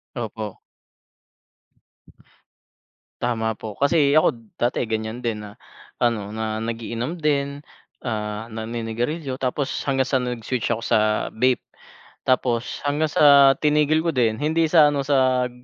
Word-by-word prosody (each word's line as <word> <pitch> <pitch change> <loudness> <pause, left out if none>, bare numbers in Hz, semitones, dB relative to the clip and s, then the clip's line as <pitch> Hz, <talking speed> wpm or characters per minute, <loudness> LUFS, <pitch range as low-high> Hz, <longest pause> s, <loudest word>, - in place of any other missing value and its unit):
Opo. 110 -4 -5 2.6
Tama 110 -2 -1
po, 110 -2 -7
kasi 140 +3 +2
ako 155 - +5 0.3
dati 120 0 +1
ganiyan 110 +2 -4
din 110 -2 -2
na 105 +1 -11 0.4
ano, 115 -4 0
na 110 0 -3
nag-iinom 115 +7 -4
din, 145 -2 -1 0.4
ah, 105 -1 -3
naninigarilyo, 120 +5 -4
tapos 135 +2 -1
hanggang 135 -1 +2
sa 130 -2 +1
nag-switch 125 -1 -3
ako 115 -1 -2
sa 115 - +3 0.3
vape, 125 +2 +1 0.6
tapos 125 -2 0
hanggang 150 +2 +1
sa 140 -3 +6
tinigil 150 +1 +2
ko 165 - +1
din. 115 -4 +1
Hindi 160 +2 +2
sa 155 -3 +6
ano, 140 - 0
sa 130 -3 +2
125 Hz, 125 wpm, -23 LUFS, 110-140 Hz, 2.6 s, sa